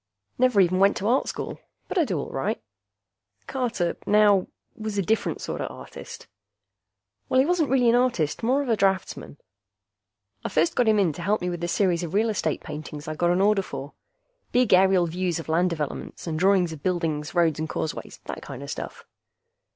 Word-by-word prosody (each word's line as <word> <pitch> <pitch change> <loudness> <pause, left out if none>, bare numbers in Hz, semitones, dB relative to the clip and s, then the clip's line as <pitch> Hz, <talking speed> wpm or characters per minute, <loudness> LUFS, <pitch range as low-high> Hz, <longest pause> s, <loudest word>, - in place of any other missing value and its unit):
Never 250 -4 +4
even 185 0 +2
went 195 +1 +4
to 200 - -2
Art 250 +4 +2
School. - - -5 0.3
But 380 - -1
I 330 - +4
do 190 - -2
all - - -5
right. 135 - -2 0.9
Carter, 240 -10 -1
now, 205 -2 +4 0.3
was 215 -3 -5
a 200 - +2
different 220 +5 0
sorta - - -3
artist. 475 0 -10 1.0
Well, 260 - +3
he 265 - +5
wasn't 335 -3 +1
really 255 -2 +3
an 230 - +5
artist 240 - +1
more 260 +5 +2
of 265 - -5
a 225 - +4
draftsman. 190 -7 -1 1.1
I - - -2
first 160 +2 +1
got 245 - +2
him 215 -1 +4
in 185 -6 +2
to 155 - -8
help 205 +5 +1
me 180 0 -2
with 175 -1 -5
a - - 0
series 180 -2 +1
of 175 +1 -4
real 220 +2 +3
estate 160 -6 -1
paintings 150 0 -7
I'd 155 0 -5
got 175 - +3
an 180 +2 +2
order 205 0 +4
for. 140 -5 -7 0.6
Big 250 -4 +3
aerial 185 -1 +5
views 175 +1 -1
of 165 - -8
land 170 +3 +2
developments, 155 -4 -5
and 160 -2 -2
drawings 185 -2 +3
of 150 - -10
buildings, 165 -3 -1
roads 165 -3 +2
and 155 0 -3
causeways, 155 - -5
that - - -6
kinda - - -8
stuff. - - -6
185 Hz, 195 wpm, -25 LUFS, 165-220 Hz, 1.1 s, he